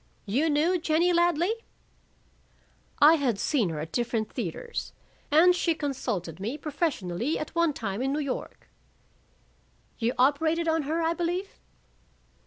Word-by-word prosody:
"You 265 +11 +1
knew 320 +5 +2
Jennie 335 +2 +2
Ladley?" 345 +3 +2 1.4
"I 305 +3 +7
had 255 -8 0
seen 225 - +1
her 155 -2 -4
at 160 +2 -6
different 230 -3 -2
theaters. 475 -1 -5 0.4
And 350 +4 +6
she 335 -2 +1
consulted 235 - -3
me 225 +9 -3
professionally 285 - -2
at 305 - -6
one 335 -2 +2
time 210 -3 -4
in 270 +1 0
New 290 - -1
York." 280 -3 -5 1.3
"You 235 +1 0
operated 315 +6 +2
on 320 0 +2
her, 330 +1 0
I 325 +1 +2
believe?" 355 +3 -3
300 Hz, 135 wpm, -27 LUFS, 240-335 Hz, 1.4 s, I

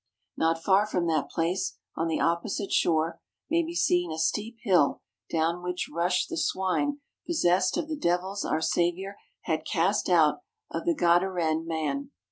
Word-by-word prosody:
Not 165 0 0
far 200 +2 +4
from 180 -5 -1
that 155 -3 0
place, 180 +3 -1 0.2
on 165 - -1
the 160 - -1
opposite 180 +4 -1
shore, 165 0 +1 0.3
may 335 +1 +4
be 335 +1 -5
seen 175 - +2
a 160 - -4
steep 210 +8 -1
hill 180 -9 +3 0.3
down 165 +2 0
which 180 0 -3
rushed 175 +2 +1
the 335 - -4
swine 285 - 0 0.3
possessed 185 - +2
of - - -2
the 315 - -3
devils 190 - -1
our 155 - -1
Saviour 175 +4 0 0.2
had 160 -2 -1
cast 190 +6 +1
out 165 - +4 0.3
of - - -4
the 340 -1 +2
Gadarene 170 - +2
man. 150 -4 -2
175 Hz, 160 wpm, -27 LUFS, 165-195 Hz, 0.3 s, far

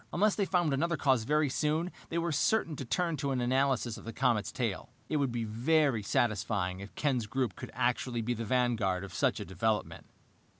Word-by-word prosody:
Unless 205 +3 +3
they 200 - 0
found 175 -5 +1
another 170 +4 0
cause 130 -5 +2
very 150 +3 +2
soon, 155 +6 0 0.2
they 165 - -2
were 170 0 0
certain 165 +1 +1
to 135 - -5
turn 170 +5 0
to 140 0 -2
an 130 -2 0
analysis 130 -2 +1
of - - -11
the 115 - -6
comet's 120 -4 +1
tail. 115 -7 -3 0.2
It 155 - +1
would 140 -3 +1
be 120 -1 -2
very 125 +3 +2
satisfying 100 -3 0
if 100 +1 -10
Ken's 130 -7 0
group 125 -5 -1
could - - -8
actually 120 -1 0
be 120 - -2
in 120 - -2
the 115 - -2
vanguard 110 -6 +1
of 95 -3 -8
such - - +1
a - - -5
development. 105 +4 -2
125 Hz, 210 wpm, -31 LUFS, 110-150 Hz, 0.2 s, Unless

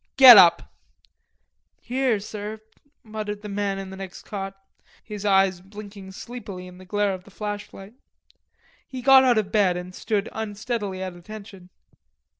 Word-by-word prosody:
"Get 260 -3 +12
up." 175 -4 +6 1.1
"Here, 250 -3 0
sir," 210 +1 -7 0.4
muttered 215 -1 -6
the 210 - -6
man 200 -1 -2
in 195 -1 -7
the - - -8
next 190 -1 -9
cot, 195 -1 -6 0.5
his 210 -2 -7
eyes 190 -2 +3
blinking 200 0 -11
sleepily 205 -5 -8
in 180 0 -13
the 185 - -13
glare 205 +1 0
of 185 -1 -8
the 200 - -17
flashlight. 205 0 -7 0.9
He 255 -2 -8
got 265 0 +8
out 245 -3 +4
of 205 -2 -1
bed 195 -4 +2
and 180 +1 -7
stood 210 +1 -2
unsteadily 210 -2 -4
at 185 -1 -6
attention. 195 0 -11
205 Hz, 150 wpm, -24 LUFS, 190-215 Hz, 1.1 s, Get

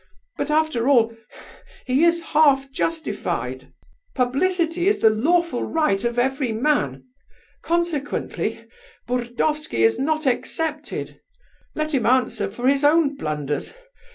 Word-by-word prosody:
But 285 - -3
after 300 -5 +1
all 230 -4 +4 0.7
he 260 +5 +2
is 340 0 +3
half 275 -4 +3
justified; 320 +3 -3 0.4
publicity 330 +7 +1
is 410 - +3
the 220 - +4
lawful 320 +4 +1
right 305 -12 0
of 235 0 -1
every 265 0 0
man; 220 - 0 0.6
consequently, 335 -4 -2 0.4
Burdovsky 245 - -1
is 115 0 +3
not 310 +2 0
excepted. 300 +4 -3 0.5
Let 310 0 -2
him 250 -5 +1
answer 245 -5 +1
for 245 +5 -3
his 280 +1 +3
own 295 -1 +4
blunders. 150 - -4
275 Hz, 115 wpm, -22 LUFS, 240-315 Hz, 0.7 s, all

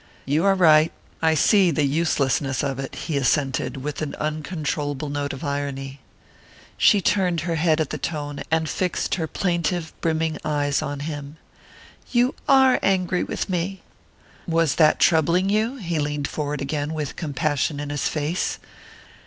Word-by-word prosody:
"You 150 +6 +1
are 195 -1 +5
right. 160 -3 +5 0.3
I 160 -1 +3
see 190 +4 +4
the 150 -2 +1
uselessness 140 -3 0
of 135 -2 -2
it," 135 - -5
he 155 -4 -1
assented, 135 +1 0
with 150 +1 -4
an 150 -2 -3
uncontrollable 150 -2 -3
note 145 0 -2
of 135 - -7
irony. 140 -1 -4 0.8
She 205 - +5
turned 180 -4 +1
her 170 +1 -2
head 160 0 +2
at 155 - -1
the - - -4
tone, 145 -3 -4
and 160 0 +1
fixed 180 +2 -1
her 165 -4 -1
plaintive 175 -2 -1
brimming 160 -1 0
eyes 145 -2 0
on 145 0 -4
him. 145 0 -6 0.7
"You 245 +2 +3 0.2
are 265 -2 +6
angry 185 -2 +1
with - - -3
me!" 185 +1 -3 0.6
"Was 165 -4 +2
that 155 -2 +5
troubling 170 +4 +3
you?" 220 +5 +1
He 175 - -3
leaned 145 -1 -1
forward 145 -2 -3
again, 145 +2 -2
with 150 -2 -4
compassion 145 -1 -1
in 145 0 -4
his 145 -2 -1
face. 155 +4 -1
155 Hz, 155 wpm, -23 LUFS, 145-170 Hz, 0.8 s, are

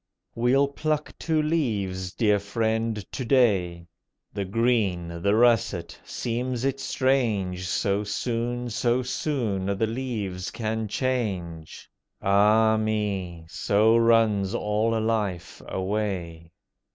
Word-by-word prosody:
We'll 130 +4 +3
pluck 150 +1 -2
two 160 -2 +1
leaves, 100 - -1
dear 105 -3 +2
friend, 110 +1 -1
to 130 - -4
day. 100 -10 +2 0.5
The 100 -1 -3
green, 95 -6 0
the 100 +3 +2
russet! 110 -8 +2
seems 125 +1 -3
it 135 0 0
strange 110 -10 0
So 100 +2 0
soon, 120 +3 -2
so 120 +3 +1
soon, 120 -8 -2
the 110 - +2
leaves 110 -6 -4
can 110 -1 -3
change! 100 -10 -3 0.3
Ah 105 +3 +4
me! 100 -6 -2
so 100 +6 +2
runs 115 -3 +3
all 110 +1 0
life 105 -6 -2
away. 95 -4 -3
110 Hz, 105 wpm, -25 LUFS, 95-120 Hz, 0.5 s, Ah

